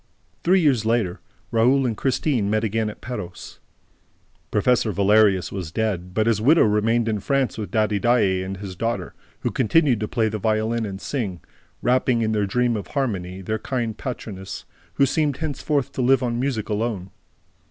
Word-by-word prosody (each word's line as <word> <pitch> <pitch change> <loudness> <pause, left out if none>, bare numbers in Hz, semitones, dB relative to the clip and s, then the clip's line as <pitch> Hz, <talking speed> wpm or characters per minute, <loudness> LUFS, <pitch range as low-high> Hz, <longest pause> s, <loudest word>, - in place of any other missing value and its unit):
Three 185 +2 +4
years 135 -8 +3
later, 110 -5 0 0.3
Raoul 125 +4 +3
and 115 -3 0
Christine 130 -3 0
met 110 +1 +1
again 110 0 0
at 105 - -10
Perros. 90 -8 -7 0.9
Professor 110 +1 +2
Valerius 100 -1 +3
was 90 -5 -5
dead, 90 -3 -2
but 110 - +2
his 115 -2 +2
widow 155 +8 +5
remained 110 +2 +2
in 110 -2 0
France 135 +4 0
with 105 -4 -5
Daddy 105 0 +1
Daae 100 -6 +2
and 95 +1 -5
his 95 -1 -7
daughter, 105 -3 -2 0.3
who - - -1
continued 135 -1 +3
to 105 - -2
play 115 -1 +1
the 110 0 -3
violin 110 +2 0
and 95 -1 -6
sing, 105 -9 -3 0.4
wrapping 125 -1 +2
in 110 - 0
their 105 -2 +1
dream 120 +3 +1
of 105 - -5
harmony 95 -9 -3
their 110 +4 -2
kind 115 -2 -2
patroness, 105 -6 -6 0.3
who 140 - +4
seemed 145 0 0
henceforth 145 -2 -1
to - - -3
live 130 +1 +3
on 120 -1 -1
music 125 -5 -1
alone. 105 -3 -2
110 Hz, 175 wpm, -23 LUFS, 100-125 Hz, 0.9 s, widow